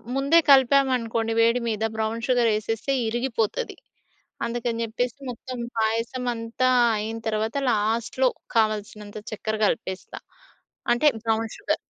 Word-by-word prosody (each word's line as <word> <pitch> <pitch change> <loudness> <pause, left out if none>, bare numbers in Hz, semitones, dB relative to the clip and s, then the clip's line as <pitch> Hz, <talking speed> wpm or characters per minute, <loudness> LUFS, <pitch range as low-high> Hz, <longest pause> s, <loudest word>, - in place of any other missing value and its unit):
ముందే 280 +5 +4
కలిపాము 270 0 +5
అనుకోండి 225 -1 -2
వేడి 230 +2 +3
మీద 220 0 -2
బ్రౌన్ 220 +2 -2
షుగర్ 245 -3 +3
వేసేస్తే 225 +5 -1
ఇరిగిపోతది. 240 - -1 0.7
అందుకని 235 0 -2
చెప్పేసి 245 +4 -3
మొత్తం 250 +1 -7 0.2
పాయసం 230 +3 -1
అంతా 230 +3 0 0.3
అయిన 220 +2 -3
తరువాత 220 +4 -1
లాస్ట్‌లో 230 +4 +1 0.3
కావాల్సినంత 215 -1 -1
చక్కెర 220 +1 -3
కలిపేస్తా 190 -2 -3 0.7
అంటే 270 +5 +3 0.2
బ్రౌన్ 225 0 0
షుగర్. 410 - -1
230 Hz, 115 wpm, -25 LUFS, 220-250 Hz, 0.7 s, కలిపాము